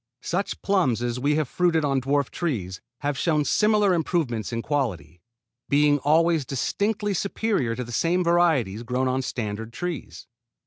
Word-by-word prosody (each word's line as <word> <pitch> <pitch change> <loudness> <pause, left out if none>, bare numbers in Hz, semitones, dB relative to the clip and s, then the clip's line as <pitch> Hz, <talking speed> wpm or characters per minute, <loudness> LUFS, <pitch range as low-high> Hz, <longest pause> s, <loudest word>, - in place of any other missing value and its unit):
Such 190 +4 -3
plums 170 - +1
as 120 0 -2
we 145 +3 +1
have 155 -2 0
fruited 165 0 +1
on 135 -2 +1
dwarf 140 +1 0
trees 100 - -3 0.2
have 145 -1 -2
shown 155 -3 +1
similar 210 0 +3
improvement 155 - -1
in 115 -1 -3
quality, 90 - -2 0.5
being 145 0 +4
always 160 +2 +3
distinctly 205 - -1
superior 195 - -1
to 125 - -4
the 120 - -9
same 170 +8 +1
varieties 160 - +2
grown 125 +2 -1
on 130 +1 0
standard 110 -3 -4
trees. 175 +2 -6
145 Hz, 150 wpm, -25 LUFS, 120-175 Hz, 0.5 s, being